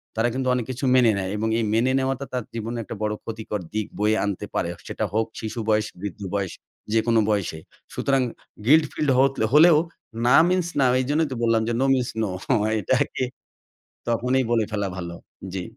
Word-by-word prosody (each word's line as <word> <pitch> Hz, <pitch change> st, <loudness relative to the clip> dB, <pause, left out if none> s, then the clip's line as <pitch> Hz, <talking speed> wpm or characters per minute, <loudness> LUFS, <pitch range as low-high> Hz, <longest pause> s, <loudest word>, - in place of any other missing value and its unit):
তারা 115 Hz, +2 st, +2 dB
কিন্তু 130 Hz, 0 st, -2 dB
অনেক 125 Hz, -3 st, -1 dB
কিছু 130 Hz, +2 st, -4 dB
মেনে 120 Hz, -3 st, +5 dB
নেয়। 95 Hz, -1 st, -2 dB
এবং 110 Hz, -, -1 dB
এই 110 Hz, -, 0 dB
মেনে 120 Hz, +3 st, +3 dB
নেওয়াটা 135 Hz, +1 st, -1 dB
তার 125 Hz, -2 st, -1 dB
জীবনে 115 Hz, +1 st, -4 dB
একটা 110 Hz, -, -7 dB
বড় 105 Hz, 0 st, 0 dB
ক্ষতিকর 110 Hz, -2 st, -4 dB
দিক 110 Hz, -1 st, -1 dB
বয়ে 105 Hz, +1 st, +3 dB
আনতে 100 Hz, -2 st, -3 dB
পারে। -, -, 0 dB, 0.2 s
সেটা -, -, -3 dB
হোক 110 Hz, +1 st, +2 dB
শিশু 110 Hz, +1 st, -5 dB
বয়স, 105 Hz, 0 st, +3 dB, 0.2 s
বৃদ্ধ 100 Hz, -1 st, -6 dB
বয়স, 100 Hz, -3 st, -1 dB, 0.4 s
যেকোনো 115 Hz, 0 st, +3 dB
বয়সে। 95 Hz, -6 st, -1 dB, 0.3 s
সুতরাং 135 Hz, -1 st, +1 dB, 0.4 s
গিল্ট 155 Hz, +4 st, +6 dB
ফিল্ড 150 Hz, -2 st, -1 dB
হ -, -, +4 dB, 0.3 s
হলেও 160 Hz, +1 st, +8 dB, 0.5 s
না 125 Hz, -, +6 dB
মিনস 180 Hz, -1 st, +1 dB
না 135 Hz, -, +4 dB
এইজন্যই 145 Hz, +5 st, +1 dB
তো -, -, -3 dB
বললাম 115 Hz, -1 st, +3 dB
যে, 120 Hz, -, 0 dB
নো 135 Hz, -, +2 dB
মিনস 125 Hz, -2 st, 0 dB
নো 105 Hz, -, -1 dB, 0.5 s
এটাকে 130 Hz, +5 st, 0 dB, 0.9 s
তখনই 125 Hz, +3 st, +1 dB
বলে 115 Hz, -2 st, +3 dB
ফেলা 100 Hz, -2 st, -1 dB
ভালো।" 85 Hz, -1 st, -5 dB, 0.4 s
জ্বি। 95 Hz, -2 st, -3 dB
115 Hz, 185 wpm, -24 LUFS, 105-130 Hz, 0.9 s, হলেও